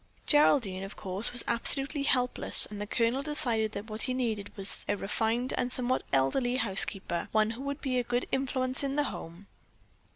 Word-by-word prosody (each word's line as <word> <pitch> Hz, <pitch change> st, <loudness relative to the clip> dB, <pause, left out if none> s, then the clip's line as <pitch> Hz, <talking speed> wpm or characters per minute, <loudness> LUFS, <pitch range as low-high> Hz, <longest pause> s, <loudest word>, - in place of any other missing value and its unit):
Geraldine, 250 Hz, -10 st, +2 dB
of 195 Hz, -, -8 dB
course, 190 Hz, +2 st, -3 dB
was 245 Hz, -, +1 dB
absolutely 270 Hz, +4 st, +3 dB
helpless 250 Hz, -3 st, +4 dB
and 205 Hz, 0 st, -8 dB
the 210 Hz, -, -5 dB
Colonel 235 Hz, +4 st, 0 dB
decided 240 Hz, -7 st, 0 dB
that 205 Hz, +2 st, -7 dB
what 215 Hz, 0 st, -6 dB
he 255 Hz, -1 st, -2 dB
needed 225 Hz, -5 st, -3 dB
was 195 Hz, 0 st, -3 dB
a 205 Hz, -, 0 dB
refined 225 Hz, +5 st, -2 dB
and 245 Hz, -, -2 dB
somewhat 255 Hz, 0 st, -1 dB
elderly 245 Hz, -, +1 dB
housekeeper, 195 Hz, -5 st, +2 dB
one 215 Hz, 0 st, +2 dB
who 230 Hz, +3 st, -8 dB
would 280 Hz, +1 st, -5 dB
be 255 Hz, -3 st, -1 dB
a -, -, -1 dB
good 245 Hz, +1 st, -2 dB
influence 260 Hz, 0 st, 0 dB
in 275 Hz, 0 st, -2 dB
the 295 Hz, -, +1 dB
home. 175 Hz, -5 st, -8 dB
235 Hz, 185 wpm, -29 LUFS, 205-260 Hz, -, helpless